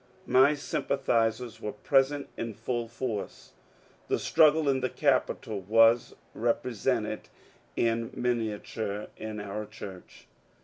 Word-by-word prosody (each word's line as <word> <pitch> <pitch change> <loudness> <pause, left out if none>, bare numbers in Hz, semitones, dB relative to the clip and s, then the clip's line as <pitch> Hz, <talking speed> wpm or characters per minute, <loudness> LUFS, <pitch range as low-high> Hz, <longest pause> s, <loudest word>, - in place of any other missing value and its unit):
My 135 +4 +5
sympathizers 120 -5 -1
were 105 - -4
present 135 +5 +2
in 115 -2 -4
full 115 +1 -3
force. 115 -3 -5 0.6
The - - +1
struggle 155 -1 +4
in 135 -1 +3
the 130 0 -1
Capitol 110 -3 0
was 115 +4 +4 0.2
represented 115 -1 -1 0.5
in 115 0 +1
minia 115 -4 -1
ture 105 -2 -4
in 110 -1 -6
our 105 +1 -5
church. 100 -4 -11
115 Hz, 115 wpm, -29 LUFS, 110-130 Hz, 0.6 s, My